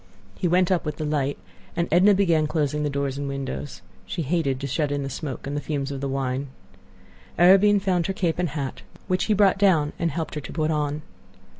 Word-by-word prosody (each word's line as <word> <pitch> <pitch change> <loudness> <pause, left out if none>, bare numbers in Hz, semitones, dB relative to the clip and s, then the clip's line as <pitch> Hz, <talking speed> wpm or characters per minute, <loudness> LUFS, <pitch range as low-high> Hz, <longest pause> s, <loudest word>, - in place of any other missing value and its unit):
He 175 - -1
went 180 +1 +3
up 180 - +2
with 150 - -3
the 155 - -4
light, 145 -2 -1 0.4
and 170 - 0
Edna 190 +5 +6
began 170 -6 +3
closing 150 -1 0
doors 140 -1 -2
and 145 - -3
windows. 140 -4 -5 0.2
She 170 - -3
hated 140 -3 0
to 140 - -4
shut 145 +2 -1
in 145 -1 -1
the 135 - -4
smoke 140 -1 -5
and 140 +1 -4
the 145 - -2
fumes 145 -2 -3
of 135 -1 -5
the 140 - -1
wine. 135 0 -2 0.9
Arobin 195 +4 +6
found 185 -3 0
her 195 - -1
cape 175 -3 -1
and 180 -2 0
hat, 140 -2 -4 0.3
which 185 0 +1
he 215 - +2
brought 200 -1 +4
down 165 -7 +3
and 170 - +1
helped 160 +1 -4
her 150 - -4
to - - -8
put 155 -1 0
on. 150 0 -1
155 Hz, 215 wpm, -24 LUFS, 140-175 Hz, 0.9 s, Edna